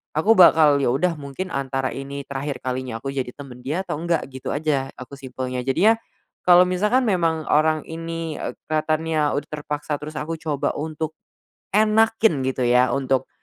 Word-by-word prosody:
aku 160 +9 +3
bakal, 160 -4 +7
ya 135 -3 +2
udah 165 +7 +1
mungkin 140 +6 -5
antara 135 -1 -1
ini 140 +1 -6
terakhir 140 +1 -4
kalinya 130 -2 -3
aku 135 +3 -4
jadi 130 -2 -2
teman 135 -4 -10
dia 150 +6 -2
atau - - -4
enggak, 170 -1 0
gitu 130 0 -5
aja, 145 -3 -1
aku 130 +2 -9
simpelnya 130 -1 -5
jadinya, 175 - +4 0.5
kalau 180 0 +7
misalkan 210 +8 +1
memang 165 -5 +1
orang 155 0 +2
ini 165 -1 -5
ek - - -6
kelihatannya 155 0 0
udah 145 - -3
terpaksa 150 0 -4
terus 150 +1 -6
aku 165 +2 -3
coba 150 -3 -2
untuk 155 +1 -4 0.6
enakin 220 -5 +3
gitu 130 -1 -1
ya 125 +1 +4
untuk, 135 -2 0
150 Hz, 165 wpm, -22 LUFS, 135-165 Hz, 0.6 s, bakal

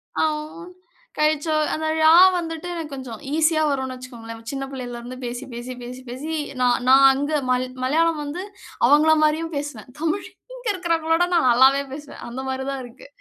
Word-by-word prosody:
அ - - 0 0.3
உ - - -12
ன், - - -12 0.5
கழிச்சோ 305 +1 +1 0.2
அந்த 315 0 -2
ழா 315 0 +6 0.3
வந்துட்டு 330 0 -5
எனக்கு 320 -4 -6
கொஞ்சம் 260 -4 -7
ஈசியா 315 0 +3
வரும்னு 265 -2 -2
வெச்சுக்கோங்களேன். 230 -3 -10
சின்ன 270 -1 -4
பிள்ளைலே 250 -2 -6
இருந்து 245 +2 -8
பேசி 245 +2 -5
பேசி 240 +2 -6
பேசி 250 +1 -8
பேசி, 270 +6 -6 0.3
நான் 245 0 +2
நான் 270 +1 +7
அங்க 285 +3 -2 0.2
மல் 250 0 +1 0.2
மலையாளம் 320 +3 +2
வந்து, 295 +6 -5 0.4
அவங்கள 305 +2 +5
மாரியும் 315 +2 +1
பேசுவேன். 280 -6 -6
தமிழ் 330 +4 -1 0.3
இங்கே - - -2
இருகவரங்களோட 330 -3 0
விட 355 - -7
நான் 255 -7 +4
நல்லாவே 265 +3 +5
பேசுவேன். 290 +1 -9
அந்த 250 +2 -5
மாரி 265 0 -3
தான் 270 -1 -4
இருக்கு. 240 +2 -14
280 Hz, 175 wpm, -22 LUFS, 255-315 Hz, 0.5 s, நான்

